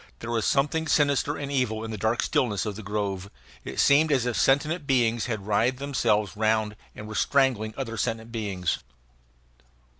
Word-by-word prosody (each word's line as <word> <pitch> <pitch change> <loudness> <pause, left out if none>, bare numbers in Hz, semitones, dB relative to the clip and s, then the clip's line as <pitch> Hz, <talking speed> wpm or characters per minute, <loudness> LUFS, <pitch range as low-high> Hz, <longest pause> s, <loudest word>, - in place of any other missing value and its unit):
There 115 - -6
was 115 -2 0
something 150 +4 +1
sinister 145 0 +2
and 140 -1 -5
evil 120 -5 0
in 110 - -5
the - - -3
dark 110 +3 +1
stillness 105 -7 0
of 105 -2 -3
the 110 - -7
grove; 100 -2 -3 0.3
it - - -6
seemed 150 +2 +5
as 130 -4 +2
if 120 -2 -1
sentient 145 - +2
beings 120 -4 +2
had 110 -5 -4
writhed 115 +5 +1
themselves 115 -8 0
round 110 0 +1 0.2
and 105 - -8
were 110 - -7
strangling 110 -1 +1
other 115 -4 -4
sentient 115 0 -2
beings. 100 -6 -2
115 Hz, 175 wpm, -26 LUFS, 105-135 Hz, 0.3 s, seemed